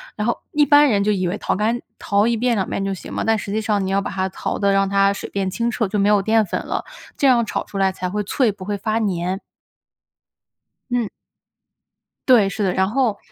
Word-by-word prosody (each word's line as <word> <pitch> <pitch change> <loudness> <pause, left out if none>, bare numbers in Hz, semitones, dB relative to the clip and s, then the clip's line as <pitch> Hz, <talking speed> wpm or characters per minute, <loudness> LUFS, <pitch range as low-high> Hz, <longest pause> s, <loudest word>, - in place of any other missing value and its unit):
然 210 +2 -2
后 235 - 0
一 295 0 +3
般 290 -1 +6
人 200 -3 +2
就 210 - +2
以 185 -3 0
为 190 +4 -2
淘 - - -1
干 225 +4 0 0.2
淘 200 +1 +1
1 235 - +2
遍、 240 +1 +1
2 190 - -1
遍 195 - -3
就 195 0 -2
行 - - -10
嘛， - - -2
但 225 0 +2
实 200 - -6
际 220 +1 0
上 205 -3 0
你 190 - -2
要 200 0 +2
把 - - -4
它 190 -1 -1
淘 - - -4
得 200 -1 +2
让 195 0 +2
它 200 0 +3
水 - - -7
变 195 -1 -2
清 235 +3 -1
澈， 225 -4 -1
就 205 +1 -2
没 200 +1 +3
有 205 -1 +5
淀 220 +1 +3
粉 195 - -3
了。 - - -3 0.3
这 280 - +2
样 240 -3 +4
炒 - - -3
出 200 - -8
来 190 -1 +2
才 185 -1 -4
会 210 +2 -2
脆， 230 +2 +1
不 190 -2 -10
会 205 0 -2
发 215 +2 -1
粘。 185 -2 -1 1.5
嗯。 240 -3 0 1.2
对， 230 -6 +6
是 200 +2 -3
的。 185 - +1
然 190 0 +1
后， 235 -3 +1
205 Hz, 250 characters per minute, -21 LUFS, 195-225 Hz, 1.5 s, 般